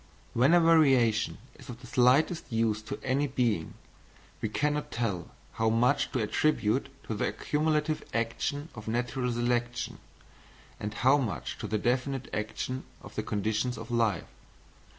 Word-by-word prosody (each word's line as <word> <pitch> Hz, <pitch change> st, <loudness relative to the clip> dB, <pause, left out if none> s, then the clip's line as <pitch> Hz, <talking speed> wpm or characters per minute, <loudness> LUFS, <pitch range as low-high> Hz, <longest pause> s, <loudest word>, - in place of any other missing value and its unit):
When 130 Hz, +8 st, +5 dB
a -, -, +7 dB
variation 135 Hz, -9 st, +4 dB, 0.2 s
is -, -, -13 dB
of 120 Hz, 0 st, -8 dB
the -, -, -11 dB
slightest 135 Hz, +6 st, +3 dB
use 110 Hz, -2 st, +1 dB
to -, -, -6 dB
any 135 Hz, +3 st, +1 dB
being, 120 Hz, -, 0 dB, 0.7 s
we 110 Hz, -, -1 dB
cannot 150 Hz, +5 st, 0 dB
tell 110 Hz, -7 st, -2 dB, 0.2 s
how 110 Hz, 0 st, +1 dB
much 125 Hz, +5 st, +2 dB
to 125 Hz, -, +1 dB
attribute 120 Hz, +1 st, +1 dB
to -, -, -4 dB
the 105 Hz, -, 0 dB
accumulative 155 Hz, 0 st, 0 dB
action 130 Hz, +6 st, -2 dB
of 110 Hz, -2 st, -10 dB
natural 125 Hz, +2 st, -1 dB
selection, 120 Hz, 0 st, -1 dB, 0.8 s
and 105 Hz, -, -3 dB
how 130 Hz, +6 st, +4 dB
much 110 Hz, -, -3 dB
to -, -, -4 dB
the 110 Hz, -, 0 dB
definite 125 Hz, +3 st, -1 dB
action 130 Hz, +4 st, -3 dB, 0.2 s
of -, -, -11 dB
the -, -, -2 dB
conditions 110 Hz, +4 st, -1 dB
of 115 Hz, +2 st, -8 dB
life. 115 Hz, -3 st, +1 dB
120 Hz, 150 wpm, -29 LUFS, 110-140 Hz, 0.8 s, a